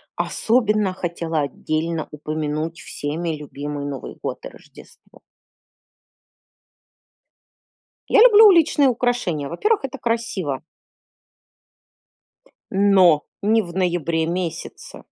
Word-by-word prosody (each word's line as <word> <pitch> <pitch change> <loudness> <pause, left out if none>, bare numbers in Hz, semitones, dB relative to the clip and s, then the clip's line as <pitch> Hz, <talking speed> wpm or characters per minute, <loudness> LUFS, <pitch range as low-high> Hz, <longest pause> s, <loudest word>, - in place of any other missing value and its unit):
Особенно 215 -5 +1
хотела 165 -3 -3
отдельно 155 +3 -3
упомянуть 155 +2 -4
всеми 160 +2 -4
любимый 145 0 -6
Новый 140 -2 -7
год - - -4
и - - -6
Рождество. - - -18 2.9
Я - - +5
люблю 445 -3 +8
уличные 325 -7 +5
украшения. 240 - -1
Во-первых, 425 - 0
это 270 +1 -5
красиво. 225 - -2 2.1
Но 190 -6 +4 0.2
не 220 +2 +3
в 175 -3 -9
ноябре 170 -3 0
месяце. 170 -1 -5
175 Hz, 85 wpm, -21 LUFS, 155-225 Hz, 2.9 s, люблю